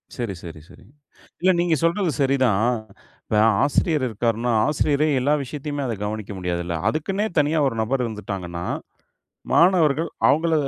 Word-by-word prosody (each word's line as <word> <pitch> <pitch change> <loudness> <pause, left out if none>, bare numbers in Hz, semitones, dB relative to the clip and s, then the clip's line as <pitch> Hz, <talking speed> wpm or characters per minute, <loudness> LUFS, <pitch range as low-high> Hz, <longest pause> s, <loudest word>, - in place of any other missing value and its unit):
சரி, 120 -5 -3
சரி, 80 -2 -9
சரி, - - -17 0.6
இல்ல 185 +2 +4
நீங்க 175 -2 +2
சொல்றது 170 +1 +1
சரி 135 0 +3
தான். 105 -4 +2 0.6
இப்ப - - -4 0.3
ஆசிரியர் 145 +1 +1
இருக்கார்ன்னா, 115 +2 -1
ஆசிரியரே 150 0 +1
எல்லா 140 +4 +2
விஷயத்தையுமே 145 +2 -5
அத 120 - -2
கவனிக்க 105 0 -4
முடியாதுல்ல? 85 -1 -2
அதுக்குன்னே 195 +7 -1
தனியா 150 +2 +2
ஒரு 130 - -1
நபர் 125 +3 0
இருந்துட்டாங்கன்னா, 95 -6 -5 0.9
மாணவர்கள் 165 -3 +3 0.2
அவுங்கள 160 +2 +2
135 Hz, 135 wpm, -23 LUFS, 110-155 Hz, 0.9 s, இல்ல